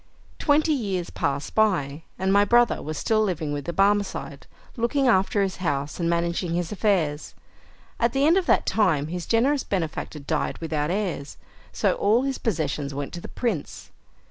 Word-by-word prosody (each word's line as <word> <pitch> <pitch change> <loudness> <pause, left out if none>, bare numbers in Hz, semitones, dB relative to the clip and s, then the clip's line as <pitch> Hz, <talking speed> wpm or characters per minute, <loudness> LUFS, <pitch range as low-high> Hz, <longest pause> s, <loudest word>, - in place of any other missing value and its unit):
Twenty 305 +1 +3
years 195 -10 -2
passed 140 0 -2
by, 165 -9 +1 0.2
and 190 +1 +1
my 200 0 +6
brother 240 +3 +3
was 155 0 -5
still 220 -1 +1
living 165 -8 -1
with 145 -1 -4
the - - -2
Barmecide, 200 +2 0 0.3
looking 255 +3 +1
after 200 -2 +3
his 190 -1 -3
house, 145 -4 -2
and 170 -1 0
managing 170 0 0
his 175 -1 -2
affairs. 180 -8 0 0.6
At 235 0 +2
the 270 +3 +2
end 325 +3 +5
of 375 -2 +1
that - - +3
time 160 -9 +1
his 175 0 -5
generous 265 +5 +2
benefactor 165 -4 -3
died 140 - -2
without 155 -2 -2
heirs, 180 -7 -3 0.3
so - - +1
all 220 +5 +2
his 270 -1 -2
possessions 155 - -2
went 140 0 -5
to 175 - -6
the - - -8
prince. 220 - -4
185 Hz, 170 wpm, -25 LUFS, 155-225 Hz, 0.6 s, my